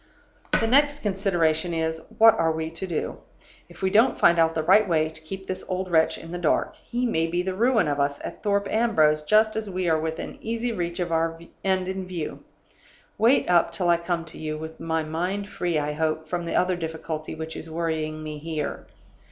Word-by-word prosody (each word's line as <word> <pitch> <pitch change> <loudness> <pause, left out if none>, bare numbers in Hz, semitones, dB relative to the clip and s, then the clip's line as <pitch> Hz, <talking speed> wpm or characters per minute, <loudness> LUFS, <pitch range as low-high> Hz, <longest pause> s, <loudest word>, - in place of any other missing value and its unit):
"The - - +1
next 285 +4 +3
consideration 175 -5 +1
is, 160 0 -1 0.2
What 225 0 +8
are 160 0 +3
we 160 0 -3
to 175 +3 -5
do? 170 -4 -3 0.5
If - - -13
we 190 - +2
don't 230 +5 +4
find 170 0 +5
out 165 0 +3
the 160 - 0
right 200 +4 +5
way 155 -2 +2
to 160 0 -9
keep 190 +4 -7
this 185 0 -4
old 185 0 -2
wretch 160 -1 +3
in 165 - -10
the 175 - -4
dark, 170 - +1
he 245 +1 -3
may 165 -9 +1
be 175 +2 -1
the 190 0 -2
ruin 230 0 +3
of 145 -1 -1
us 140 0 0
at - - -7
Thorpe 200 -1 +1
Ambrose 160 -10 +3
just 215 +7 +3
as 220 -2 -3
we 185 -1 -2
are 160 -1 +3
within 160 0 -4
easy 230 +2 -2
reach 175 -4 -3
of 175 -1 -2
our 165 0 0 0.2
end 190 -1 +1
in 190 0 -4
view. 175 -4 -5 0.8
Wait 240 +5 +4
up 175 -1 +4
till 180 -2 -1
I 170 - +5
come 170 -1 -2
to 165 - -9
you, 155 -1 -3
with 160 +1 -8
my 160 -1 -1
mind 180 +6 -2
free, 175 -5 -1
I 150 0 -1
hope, 155 +1 -1
from 175 +1 -3
the 170 - -3
other 180 0 +2
difficulty 160 -2 -5
which 160 0 -6
is 165 - -8
worrying 160 -1 -2
me 155 -1 -6
here. 155 -2 -4
170 Hz, 215 wpm, -25 LUFS, 160-190 Hz, 0.8 s, What